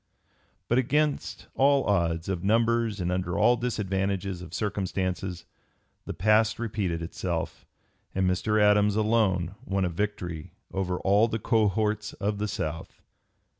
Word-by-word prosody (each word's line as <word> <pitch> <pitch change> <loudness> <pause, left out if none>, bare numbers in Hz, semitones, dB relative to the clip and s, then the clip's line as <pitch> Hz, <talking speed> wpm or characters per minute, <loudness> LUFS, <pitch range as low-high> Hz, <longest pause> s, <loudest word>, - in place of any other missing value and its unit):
But 120 - +3
against 150 +3 0
all 140 0 +4
odds 85 -4 0
of 95 -2 -2
numbers 115 0 +2
and 90 0 -1
under 90 -1 -1
all 120 - +5
disadvantages 95 -5 -2
of 90 - -9
circumstances 95 -3 -2 0.6
the - - -4
past 110 +3 +3
repeated 100 -7 -2
itself, 85 - -4 0.5
and 95 0 +2
Mr. 105 +4 +1
Adams 105 0 +4
alone 105 -5 +1
won 95 -1 0
a - - 0
victory 90 -3 -4 0.2
over 95 -2 -1
all 100 +4 +4
the 110 - -2
cohorts 105 -1 +1
of 105 0 -2
the 105 - -1
South. 80 -4 -5
100 Hz, 130 wpm, -27 LUFS, 90-110 Hz, 0.6 s, all